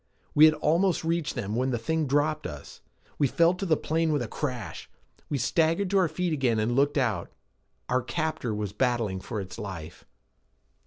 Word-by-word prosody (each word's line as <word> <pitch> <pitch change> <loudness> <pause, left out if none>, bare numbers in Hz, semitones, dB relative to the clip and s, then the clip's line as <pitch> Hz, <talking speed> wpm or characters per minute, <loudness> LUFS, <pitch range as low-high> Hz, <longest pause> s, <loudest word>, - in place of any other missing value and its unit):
We 150 - +8
had 155 0 +5
almost 165 +4 +2
reached 165 -1 -1
them 110 -4 -3
when 130 +2 +1
the 120 - 0
thing 155 +7 -1
dropped 150 +3 +1
us. 75 -1 -10 0.4
We 145 - +4
fell 170 +6 +3
to 190 +1 -4
the 155 -3 +3
plain 160 0 0
with 145 -4 +1
a - - -4
crash. 120 - -5 0.4
We 145 - 0
staggered 165 - +1
to 200 - +4
our 180 - +3
feet 165 +2 -2
again 130 -6 +1
and 110 +3 0
looked 140 +2 +2
out. 115 -10 0 0.6
Our 125 +1 +1
captor 155 -2 -2
was 105 -2 -3
battling 115 -5 0
for 110 +3 -5
its 95 -2 -7
life. 90 -6 -8
140 Hz, 190 wpm, -27 LUFS, 115-160 Hz, 0.6 s, We